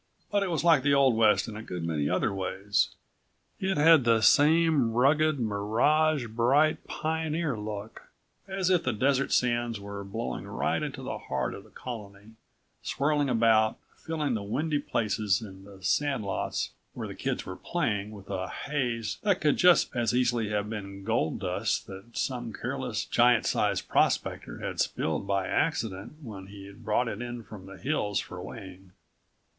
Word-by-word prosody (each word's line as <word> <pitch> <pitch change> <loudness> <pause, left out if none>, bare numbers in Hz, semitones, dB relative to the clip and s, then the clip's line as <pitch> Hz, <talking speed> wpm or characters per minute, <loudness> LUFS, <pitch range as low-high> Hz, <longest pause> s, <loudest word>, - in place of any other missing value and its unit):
But 205 - +2
it 195 - 0
was 165 -3 -1
like 165 -5 +5
the 140 +1 +3
Old 135 -4 +4
West 110 0 +4
in 110 - -7
a 110 - -6
good 90 -6 -6
many 75 -3 -1
other 90 +3 +1
ways. 95 +2 0 0.7
It 190 -2 0
had 160 -1 +6
the 115 -2 +3
same 150 -2 +4
rugged, 145 +4 +3
mirage 120 +8 +2
bright 125 +7 +2
pioneer 160 -2 -1
look, 105 0 -6 0.5
as 190 -1 0
if 180 -2 +4
the 130 - -1
desert 135 +5 +1
sands 120 -2 +1
were 100 0 -7
blowing 110 +4 -5
right - - -1
into - - -5
the - - -4
heart 65 0 -2
of - - -9
the - - -19
colony, 105 -3 -9 0.5
swirling 145 0 0
about, 110 -2 +3 0.2
filling 155 -4 -2
the 110 - -1
windy 145 +9 -1
places 105 -6 0
and 95 -3 -11
the 95 -2 -14
sand 135 +1 +1
lots 100 - -2 0.2
where - - -4
the - - -7
kids - - -3
were - - -6
playing 105 0 -2
with 100 -2 -11
a 95 -1 -3
haze 120 -8 -2
that 200 -3 +2
could 150 -2 +2
just 180 -7 +5
as 120 -1 +1
easily 120 -3 +1
have 105 -1 -1
been 100 -3 -6
gold 110 -6 0
dust - - -1
that 95 +4 -11
some 120 -3 -2
careless, - - -3
giant - - +4
size - - +1
prospector - - 0
had - - -4
spilled 80 +5 -1
by 100 -1 +1
accident 110 - -1
when 100 -6 -8
he'd 100 +2 -12
brought 110 +3 +1
it 110 0 -4
in 120 -1 -5
from 100 -3 -11
the 100 0 -10
hills 105 -6 -1
for - - -7
weighing. 95 -1 -10
115 Hz, 170 wpm, -28 LUFS, 100-145 Hz, 0.7 s, had